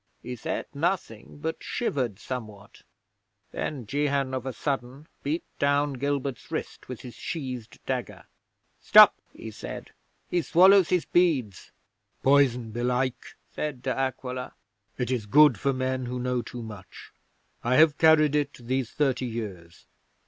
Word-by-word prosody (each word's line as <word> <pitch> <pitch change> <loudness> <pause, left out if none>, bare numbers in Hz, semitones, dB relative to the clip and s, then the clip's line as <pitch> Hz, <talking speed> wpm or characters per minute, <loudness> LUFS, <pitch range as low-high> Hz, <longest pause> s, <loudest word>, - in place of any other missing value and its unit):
He 125 - -5
said 120 - -3
nothing, 150 - -2
but 160 +2 -3
shivered 130 - -2
somewhat. 105 -4 -8 0.7
'Then 135 -6 -4
jehan 140 +1 0
of 130 0 -3
a - - -1
sudden 135 +1 -4 0.2
beat 155 +4 -2 0.2
down 145 0 +2
Gilbert's 140 -1 -3
wrist - - -5
with 125 - -6
his 125 -2 -9
sheathed 125 -8 -6
dagger. 115 -9 -4 0.6
"Stop!" - - +8 0.2
he 110 - -9
said. - - -8 0.4
"He 175 - 0
swallows 185 +3 +6
his 180 -3 +1
beads." 140 - +1 0.5
'"Poison, 130 -5 +3
belike," 125 +2 -2 0.2
said 140 -5 -4
De 130 - -1
Aquila. 130 -1 -3 0.4
"It 125 0 -2
is 115 -5 -2
good 145 -2 +6
for 140 - +1
men 130 -1 -2
who 125 +1 -4
know 125 0 -1
too 120 0 -8
much. 105 -4 -11 0.5
I 120 +2 +2
have 155 0 +5
carried 155 -2 +5
it 150 -1 0
these 125 0 -2
thirty 130 -4 0
years. 95 -8 -7
130 Hz, 140 wpm, -27 LUFS, 120-145 Hz, 0.7 s, Stop